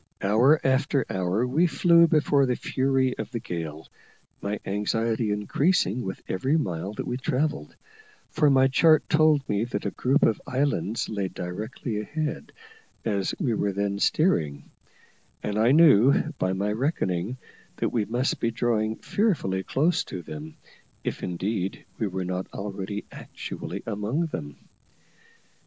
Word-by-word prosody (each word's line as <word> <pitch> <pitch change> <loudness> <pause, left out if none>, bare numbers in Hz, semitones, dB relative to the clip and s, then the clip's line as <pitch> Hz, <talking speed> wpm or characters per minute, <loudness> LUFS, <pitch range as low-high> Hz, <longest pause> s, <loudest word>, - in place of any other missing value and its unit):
Hour 120 +10 +5
after 135 0 +2
hour 95 +5 0
we 150 +8 +2
flew 170 0 +5
before 145 -3 +3
the 125 - +1
fury 130 0 0
of - - -4
the 115 - -4
gale, 80 -8 -6 0.5
my 105 +1 -3
anxiety 110 +3 0
increasing 115 - +1
with 95 -5 -6
every 130 +11 +1
mile 95 - -3
that - - -5
we 125 - -2
travelled, 150 +4 -2 0.6
for 155 -2 +3
my 135 -1 +5
chart 155 +3 +4
told 155 -3 +3
me 105 +1 0
that 120 - -4
a - - -1
group 135 +4 +1
of 110 - +2
islands 130 -5 0
lay 100 -3 -2
directly 105 +6 -5
ahead 155 +7 -4 0.5
as 100 -4 -1
we 135 - +1
were 100 -2 0
then 100 0 -1
steering; 75 - +1 0.7
and 105 0 -1
I 115 +3 +4
knew, 140 -1 +5
by 95 0 +1
my 100 +2 -1
reckoning, 110 - -1 0.4
that - - -1
we 110 -4 0
must 120 +5 -1
be 115 - +1
drawing 110 -2 0
fearfully 160 - 0
close 160 - +1
to 90 -2 -7
them, 75 0 -8 0.5
if - - -3
indeed 95 +2 -3
we 110 - 0
were 95 -1 -3
not 90 +1 -3
already 100 0 -5
actually - - -7
among 110 +11 -1
them. 75 - -6
115 Hz, 145 wpm, -26 LUFS, 100-140 Hz, 0.7 s, Hour